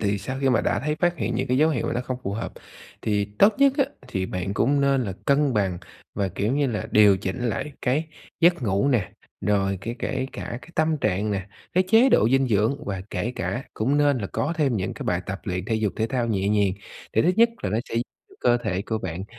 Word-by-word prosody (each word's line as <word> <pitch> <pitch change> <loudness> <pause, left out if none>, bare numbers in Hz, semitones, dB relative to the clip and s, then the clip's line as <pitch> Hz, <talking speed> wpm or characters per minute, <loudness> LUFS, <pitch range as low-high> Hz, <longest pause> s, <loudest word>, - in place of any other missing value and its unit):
thì 100 -1 0
sau 130 +7 -5
khi 135 - +2
mà 125 - +3
đã - - 0
thấy 150 +2 -1
phát 175 0 +2
hiện - - -2
những - - -1
cái 125 - +2
dấu 155 +3 +4
hiệu 130 - -1
mà - - -1
nó 120 - 0
không 125 0 -4
phù 100 - -3
hợp 110 - -4 0.5
thì 105 -2 +1
tốt 205 +1 +6
nhất 275 -1 +5
á 275 - +5 0.2
thì 95 -6 -2
bạn 90 +2 -3
cũng 140 +3 +2
nên 135 -2 +2
là 95 - -3
cân 140 -2 +2
bằng 95 -4 0 0.4
và, 100 -1 0
kiểu 100 +5 -1
như 145 - +2
là, 115 -5 -2
điều 105 -2 +6
chỉnh 120 +5 -3
lại 150 +6 -3
cái 145 +6 +1 0.3
giấc 175 -4 +4
ngủ 100 +3 +1
nè, 115 -9 +1 0.3
rồi 100 -1 +1
kể 115 +3 -4
kể 130 0 -2
cả 120 - -5
cái - - -14
tâm 155 0 +2
trạng 105 -1 0
nè, 95 -1 -2 0.3
cái 185 +1 +3
chế 230 +5 +6
độ 110 - +4
dinh 135 -1 +3
dưỡng, 115 +8 +1
và 95 -2 -3
kể 105 +7 -2
cả 95 +10 -3
cũng 135 +7 +1
nên 145 -3 +3
là 100 - -3
có 150 - -2
thêm 140 -7 +1
những 95 -2 -3
cái - - -7
bài 90 0 0
tập 95 0 -4
luyện 90 -2 -3
thể 110 - -1
dục 110 -2 0
thể 110 - 0
thao 125 -1 -1
nhẹ 100 -3 0
nhàng. 100 -3 +2 0.4
Thì 110 - +3
thứ 180 - +4
nhất 230 +1 +6
là 95 - -1
nó 110 - +1
sẽ - - -6
giúp 115 - +2 0.4
cơ 120 -1 +4
thể 100 -5 -2
của 110 0 -2
bạn 95 -1 -5
115 Hz, 255 wpm, -24 LUFS, 100-140 Hz, 0.5 s, tốt